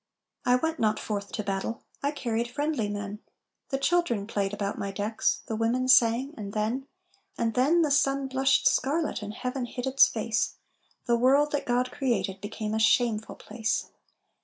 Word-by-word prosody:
"I 250 Hz, -, +6 dB
went 320 Hz, +5 st, -1 dB
not 215 Hz, -1 st, +2 dB
forth 200 Hz, -2 st, -4 dB
to 210 Hz, -, -2 dB
battle, 200 Hz, +4 st, -3 dB, 0.2 s
I 280 Hz, -, +1 dB
carried 235 Hz, -5 st, -2 dB
friendly 290 Hz, -5 st, -1 dB
men, 205 Hz, 0 st, -5 dB, 0.5 s
The 270 Hz, -, 0 dB
children 275 Hz, -9 st, +1 dB
played 200 Hz, -2 st, -1 dB
about 205 Hz, -1 st, -3 dB
my 200 Hz, -, -2 dB
decks, 205 Hz, +3 st, -1 dB
The 220 Hz, -, -3 dB
women 235 Hz, +3 st, 0 dB
sang 255 Hz, +2 st, +4 dB
and 200 Hz, -2 st, -7 dB
then 225 Hz, +6 st, -1 dB, 0.5 s
And 230 Hz, -1 st, 0 dB
then 305 Hz, +8 st, +3 dB
the 300 Hz, -, 0 dB
sun 275 Hz, -1 st, +2 dB
blushed 265 Hz, +1 st, +3 dB
scarlet 295 Hz, +1 st, +1 dB
And 210 Hz, +1 st, -6 dB
Heaven 250 Hz, +1 st, -3 dB
hid 245 Hz, +1 st, -5 dB
its 265 Hz, +1 st, +6 dB
face, -, -, -1 dB, 0.5 s
The 235 Hz, -1 st, +3 dB
world 280 Hz, +4 st, +4 dB
that 290 Hz, -, -2 dB
God 250 Hz, +1 st, +1 dB
created 200 Hz, -8 st, -1 dB
Became 215 Hz, +1 st, -4 dB
a 220 Hz, -, 0 dB
shameful 220 Hz, -1 st, +2 dB
place! 225 Hz, +1 st, -3 dB
235 Hz, 170 wpm, -27 LUFS, 210-270 Hz, 0.5 s, I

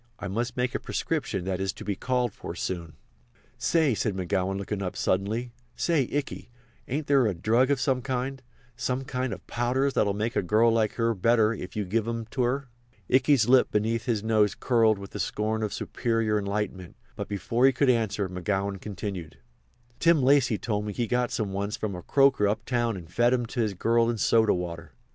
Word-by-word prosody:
"I -, -, -5 dB
must 115 Hz, +6 st, -3 dB
make 125 Hz, 0 st, 0 dB
a -, -, -1 dB
prescription 125 Hz, -, -2 dB
that 95 Hz, -1 st, -2 dB
is 95 Hz, -1 st, -1 dB
to -, -, -10 dB
be 100 Hz, -, -1 dB
called 125 Hz, -2 st, -1 dB
for -, -, -7 dB
soon." 85 Hz, -4 st, -4 dB, 0.7 s
"Say," 160 Hz, -6 st, +2 dB
said 110 Hz, -1 st, -1 dB
McGowan, 95 Hz, +1 st, -1 dB
looking 100 Hz, +1 st, -4 dB
up 90 Hz, -2 st, -3 dB
suddenly, 110 Hz, +6 st, -1 dB, 0.2 s
"say, 155 Hz, -7 st, +1 dB
Ikey, 145 Hz, -3 st, -3 dB, 0.4 s
ain't 145 Hz, +4 st, -2 dB
there 135 Hz, -4 st, +4 dB
a 100 Hz, -, -1 dB
drug 115 Hz, +9 st, +2 dB
of 140 Hz, -2 st, +2 dB
some 130 Hz, -1 st, +1 dB
kind—some 125 Hz, 0 st, -4 dB
kind 130 Hz, -1 st, -3 dB
of 95 Hz, -, -7 dB
powders 130 Hz, +3 st, 0 dB
that'll 100 Hz, -2 st, +1 dB
make 110 Hz, +3 st, -2 dB
a -, -, +2 dB
girl 110 Hz, +5 st, +3 dB
like 110 Hz, -2 st, +1 dB
you 115 Hz, -1 st, +2 dB
better 115 Hz, +2 st, +3 dB
if 90 Hz, -4 st, -8 dB
you 105 Hz, -1 st, -1 dB
give 110 Hz, +4 st, -1 dB
'em 115 Hz, -1 st, -3 dB
to 130 Hz, -, -1 dB
her?" 130 Hz, +2 st, 0 dB, 0.4 s
Ikey's 130 Hz, -3 st, +4 dB
lip 130 Hz, 0 st, +5 dB
beneath 110 Hz, +2 st, 0 dB
his 110 Hz, -4 st, 0 dB
nose 110 Hz, -2 st, +2 dB
curled 115 Hz, -4 st, +3 dB
with 100 Hz, 0 st, -9 dB
the 105 Hz, -, -6 dB
scorn 110 Hz, +4 st, -1 dB
of 105 Hz, -2 st, -1 dB
superior 115 Hz, -3 st, 0 dB
enlightenment; 100 Hz, -3 st, -3 dB, 0.2 s
but -, -, -5 dB
before 115 Hz, +6 st, +2 dB
he -, -, +5 dB
could 135 Hz, +2 st, +1 dB
answer, 110 Hz, -4 st, 0 dB
McGowan 95 Hz, +2 st, -2 dB
continued: 95 Hz, -6 st, -6 dB, 0.6 s
"Tim 165 Hz, -5 st, +4 dB
Lacy 130 Hz, -4 st, +4 dB
told 105 Hz, -2 st, -2 dB
me 105 Hz, -, -3 dB
he 120 Hz, -, -1 dB
got 125 Hz, +1 st, 0 dB
some 100 Hz, -3 st, -2 dB
once 100 Hz, +1 st, -2 dB
from 105 Hz, -2 st, -3 dB
a 90 Hz, -, -6 dB
croaker 135 Hz, -2 st, +3 dB
uptown 115 Hz, +1 st, -1 dB
and 85 Hz, -3 st, -10 dB
fed 120 Hz, +5 st, +4 dB
'em 120 Hz, -1 st, -1 dB
to 120 Hz, +2 st, -6 dB
his 110 Hz, -4 st, 0 dB
girl 115 Hz, +4 st, +2 dB
in 120 Hz, -, -1 dB
soda 110 Hz, -1 st, +3 dB
water. 85 Hz, -3 st, -6 dB
115 Hz, 200 wpm, -27 LUFS, 100-125 Hz, 0.7 s, lip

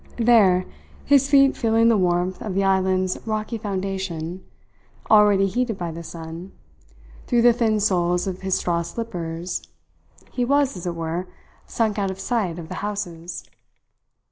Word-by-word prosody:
There, 215 Hz, -6 st, +4 dB, 0.4 s
his 280 Hz, -1 st, +4 dB
feet 275 Hz, -1 st, +5 dB
feeling 225 Hz, -1 st, +2 dB
the 230 Hz, -, +5 dB
warmth 180 Hz, -1 st, 0 dB
of 205 Hz, -4 st, -4 dB
the 195 Hz, -, +2 dB
island's 190 Hz, -1 st, +1 dB
rocky 215 Hz, +1 st, -2 dB
foundation 190 Hz, -4 st, -4 dB, 0.7 s
already 205 Hz, -2 st, +6 dB
heated 225 Hz, +2 st, -1 dB
by 175 Hz, -2 st, -4 dB
the 165 Hz, +1 st, -7 dB
sun, 165 Hz, +2 st, -9 dB, 0.7 s
through 240 Hz, -2 st, +2 dB
the 240 Hz, 0 st, +7 dB
thin 225 Hz, -2 st, +1 dB
soles 180 Hz, -3 st, +1 dB
of 190 Hz, -1 st, -5 dB
his 190 Hz, -1 st, 0 dB
straw 170 Hz, -1 st, 0 dB
slippers 170 Hz, -3 st, -5 dB, 0.7 s
he 250 Hz, -, -1 dB
was, 280 Hz, 0 st, +2 dB
as 180 Hz, -1 st, -6 dB
it 170 Hz, -, -3 dB
were, 165 Hz, +2 st, -3 dB, 0.4 s
sunk 215 Hz, -3 st, -1 dB
out 195 Hz, -1 st, 0 dB
of 190 Hz, 0 st, -6 dB
sight 195 Hz, -5 st, -1 dB
of 165 Hz, -2 st, -7 dB
the -, -, -6 dB
houses. 175 Hz, -4 st, -5 dB
190 Hz, 150 wpm, -23 LUFS, 175-225 Hz, 0.7 s, the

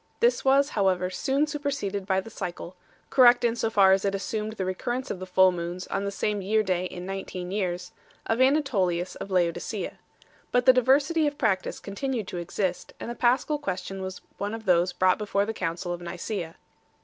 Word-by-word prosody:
This 480 Hz, +1 st, +3 dB
was, 275 Hz, +1 st, +4 dB
however, 185 Hz, -4 st, +1 dB
soon 270 Hz, +9 st, +1 dB
superseded 280 Hz, -10 st, -3 dB
by 190 Hz, -1 st, +2 dB
the 225 Hz, -, -11 dB
cycle 180 Hz, -2 st, -6 dB, 0.4 s
correct 245 Hz, -2 st, +6 dB
in 235 Hz, -1 st, +2 dB
so 225 Hz, -, 0 dB
far 200 Hz, -3 st, +5 dB
as 190 Hz, 0 st, +3 dB
it 200 Hz, -1 st, 0 dB
assumed 215 Hz, +2 st, -3 dB
the 195 Hz, -4 st, -3 dB
recurrence 240 Hz, +8 st, -3 dB
of 185 Hz, -, -4 dB
the 185 Hz, -, -7 dB
full 185 Hz, 0 st, +5 dB
moons 175 Hz, +1 st, -5 dB
on 195 Hz, +1 st, -1 dB
the 200 Hz, -, -2 dB
same 205 Hz, 0 st, -1 dB
year 215 Hz, +3 st, +2 dB
day 185 Hz, -2 st, 0 dB
in 180 Hz, 0 st, -6 dB
nineteen 185 Hz, -1 st, -5 dB
years 180 Hz, -3 st, -2 dB, 0.3 s
of 225 Hz, +3 st, 0 dB
Anatolius 200 Hz, -, +2 dB
of -, -, -7 dB
Laodicea 175 Hz, -3 st, -1 dB
2. -, -, -24 dB, 0.6 s
But 245 Hz, 0 st, +2 dB
diversity 270 Hz, +5 st, +4 dB
of 290 Hz, 0 st, -3 dB
practice 195 Hz, -8 st, 0 dB
continued 225 Hz, +1 st, -3 dB
to -, -, -5 dB
exist, 180 Hz, +1 st, -3 dB
arid 235 Hz, -, -5 dB
the -, -, -6 dB
Paschal 265 Hz, +5 st, +2 dB
question 190 Hz, -6 st, -4 dB
was 190 Hz, -1 st, -6 dB, 0.2 s
one 205 Hz, +2 st, -2 dB
of 225 Hz, -1 st, -9 dB
those 180 Hz, -1 st, +3 dB
brought 185 Hz, +1 st, +2 dB
before 205 Hz, -1 st, 0 dB
the 225 Hz, -, -3 dB
Council 175 Hz, -2 st, -3 dB
of 175 Hz, -, -6 dB
Nicsea. 175 Hz, 0 st, -5 dB
200 Hz, 195 wpm, -26 LUFS, 185-240 Hz, 0.6 s, correct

